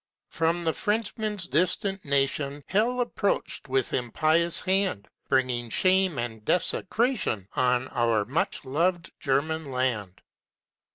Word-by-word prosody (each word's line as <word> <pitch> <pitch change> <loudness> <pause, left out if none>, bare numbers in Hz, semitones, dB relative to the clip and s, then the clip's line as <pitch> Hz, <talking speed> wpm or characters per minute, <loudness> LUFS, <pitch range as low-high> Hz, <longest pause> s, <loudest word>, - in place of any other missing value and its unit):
From 165 +1 0
the 160 -1 +1
Frenchman's 210 -2 -2
distant 185 +4 0
nation 140 0 0
Hell 240 +5 +1
approach'd, 205 -10 -1
with 130 -1 0
impious 155 +7 +2
hand, 190 - 0 0.2
Bringing 125 -2 +1
shame 185 - +3
and 115 -2 -4
desecration 180 - 0
On 125 0 +1
our 115 -4 +1
much 140 +3 -2
loved 170 +6 0
German 150 +2 0
land. 120 -8 -2
155 Hz, 110 wpm, -27 LUFS, 125-185 Hz, 0.2 s, shame